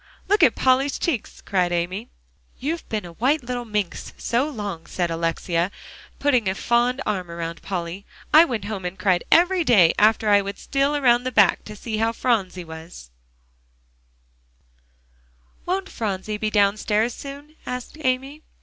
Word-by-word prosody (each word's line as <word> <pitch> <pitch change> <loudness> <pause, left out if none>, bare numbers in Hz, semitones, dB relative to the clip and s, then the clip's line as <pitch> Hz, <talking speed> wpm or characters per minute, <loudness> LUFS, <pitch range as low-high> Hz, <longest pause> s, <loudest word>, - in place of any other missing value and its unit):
"Look 415 0 +3
at 265 -8 +5
Polly's 265 +2 +2
cheeks!" 280 -11 -3
cried 180 -3 0
Amy. 180 +7 -2 0.5
"You've 315 +6 -4
been 215 -4 -2
a 170 - -10
white 265 - +1
little 245 0 -4
minx 210 -5 -3
so 250 +6 0
long," 205 - -6
said 175 -2 -2
Alexia, 165 +1 -1 0.5
putting 255 -7 +2
a 190 - -2
fond 245 +5 +1
arm 185 -5 -2
around 170 0 -5
Polly; 180 0 -5 0.3
"I 315 +2 +10
went 230 - -3
home 205 -3 -5
and 180 +1 -4
cried 185 -4 +2
every 355 +1 +5
day, 200 - +5
after 215 0 +4
I 205 -1 +6
would 200 0 -6
steal 275 +1 0
around 245 -4 +3
the 255 - -2
back - - +4
way - - -31
to 210 - -8
see 220 +1 -4
how 225 +1 +1
Phronsie 200 -7 0
was" 160 - -11 2.6
"Won't 380 +2 -1
Phronsie 210 - -3
be 215 0 -1
downstairs 210 +2 +2
soon?" 285 +2 -10
asked 250 +2 -5
Amy. 265 +3 -1
215 Hz, 160 wpm, -23 LUFS, 185-260 Hz, 2.6 s, I